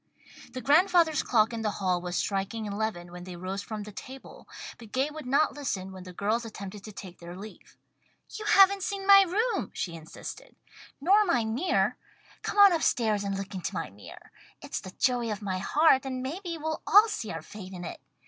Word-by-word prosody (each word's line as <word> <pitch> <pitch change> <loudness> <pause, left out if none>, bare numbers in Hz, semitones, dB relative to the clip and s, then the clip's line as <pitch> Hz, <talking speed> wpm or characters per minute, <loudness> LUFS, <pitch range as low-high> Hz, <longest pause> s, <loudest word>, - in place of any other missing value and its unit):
The 255 - -5
grandfather's 325 +1 +4
clock 225 -1 +2
in 230 - -3
the 215 - 0
hall 185 -2 0
was 175 0 -4
striking 200 +4 -2
eleven 200 -4 -3
when 175 0 -9
they 180 -1 -8
rose 185 +3 -4
from 210 +1 -6
the 210 - -9
table, 260 +6 -11 0.3
but 225 -3 -13
Gay 270 +5 0
would 305 -4 -8
not 280 +3 +3
listen 205 -10 -4
when 185 -1 -10
the 180 - -8
girls 215 +6 -1
attempted 205 -3 -8
to 215 - -8
take 185 -3 -10
their 170 +1 -9
leave. 210 +3 -12 0.5
"You 430 - -7
haven't 395 -1 +6
seen 395 -1 -3
my 395 0 +9
room," 415 +6 0
she 170 - -3
insisted, 165 - -9 0.4
"nor 390 +9 +5
my 255 - +1
mirror. 260 +12 +1 0.4
Come - - -4
on 400 -2 +8
up 330 - 0
stairs 215 -7 +1
and 195 -1 -2
look 195 +1 -6
into 185 -2 -4
my - - -4
mirror. 100 +1 -13 0.3
It's - - -5
the 185 - -9
joy 245 -3 +1
of 210 0 -5
my 190 -2 -2
heart, 280 - +4
and 255 -1 -4
maybe 335 +5 -4
we'll 315 0 -3
all 410 +8 +7
see 225 - -4
our 165 -1 -6
fate 195 0 -10
in 180 -1 -7
it. - - -7
225 Hz, 205 wpm, -28 LUFS, 195-315 Hz, 0.5 s, my